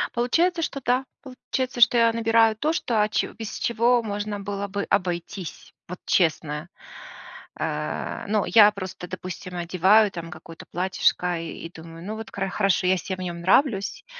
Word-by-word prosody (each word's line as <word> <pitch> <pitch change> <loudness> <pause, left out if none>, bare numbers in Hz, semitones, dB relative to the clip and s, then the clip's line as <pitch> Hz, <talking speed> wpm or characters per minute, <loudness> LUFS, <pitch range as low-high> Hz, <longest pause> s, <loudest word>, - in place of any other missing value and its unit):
Получается, 330 +9 +2
что 285 - -3
да, 255 0 0 0.2
получается, 255 -1 -4
что 240 - +7
я 230 -1 +4
набираю 225 -1 +3
то, 300 +8 0
что, 235 -9 0
а 210 - +2
че - - -1
без 225 -2 -6
чего 235 +1 +2
можно 205 -1 -3
было 200 0 -4
бы 200 0 -3
обойтись, 180 0 -3
вот 180 - -7
честно. 155 -2 0 0.9
А, - - -3
ну 210 -1 +1
я 210 -2 +7
просто, 190 -3 -7
допустим, 185 0 -7
одеваю 185 +5 +4
там 170 -2 -7
какое-то 165 +1 -11
платьишко 180 -1 +1
и 165 0 -7
и - - -19
думаю, 165 0 -11
ну, 215 +2 -4
вот 220 0 -7
кара 195 -1 -3
хорошо, 195 -1 +1
я 185 - +3
се 190 +1 -4
в - - -14
нем 175 -2 -5
нравлюсь, 225 - +2
200 Hz, 170 wpm, -24 LUFS, 180-230 Hz, 0.9 s, что